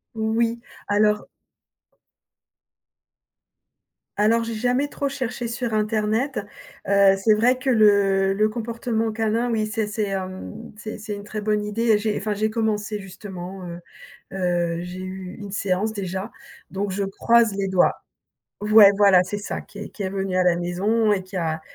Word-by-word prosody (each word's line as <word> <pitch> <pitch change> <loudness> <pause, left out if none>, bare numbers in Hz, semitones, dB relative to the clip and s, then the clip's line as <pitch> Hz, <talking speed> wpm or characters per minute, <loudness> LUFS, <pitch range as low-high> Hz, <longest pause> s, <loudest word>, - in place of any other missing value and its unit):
Oui, 225 +1 0 0.3
alors 210 0 +2 2.9
alors, 225 +3 +3
j'ai 230 0 -4
jamais 250 +5 0
trop 280 - -2
cherché 255 -3 -3
sur 235 -1 -3
Internet. 215 +5 0 0.5
Heu, 200 -1 +5
c'est 215 +3 +3
vrai 240 +4 +3
que 260 +1 -2
le 200 -4 +4
le 215 +2 +2
comportement 225 0 -2
canin, 225 +2 0
oui, 220 -2 0
c'est 215 -1 -2
c'est, 210 0 -2
hem, 190 +4 -6
c'est 215 +1 -7
c'est 210 -1 -6
une 205 - -8
très 215 +1 -5
bonne 210 0 0
idée 210 +3 -2
et 215 - +5
j'ai, 210 0 -1
enfin, 210 +2 -2
j'ai 215 +2 0
commencé 215 -1 -1
justement, 190 -1 -8
heu, 170 0 -7 0.5
heu, 175 -2 0
j'ai 180 +1 -7
eu 185 0 -7
une 205 -2 -8
séance 200 +2 -1
déjà 190 +1 -4 0.4
donc 195 +1 -2
je 200 +2 -1
croise 230 +3 +3
les 195 0 -1
doigts. 185 -1 +3 0.7
Ouais, 210 -1 +8
voilà 195 -3 +6
c'est 205 +3 -4
ça 205 - -4
qui 205 - -14
est - - -6
qui 210 - -7
est 190 - -2
venu 195 -1 -2
à 185 - +3
la 175 -1 +3
maison 205 +5 +1
et 190 - 0
qui 185 +1 -9
a 160 -2 -1
210 Hz, 165 wpm, -23 LUFS, 195-225 Hz, 2.9 s, Ouais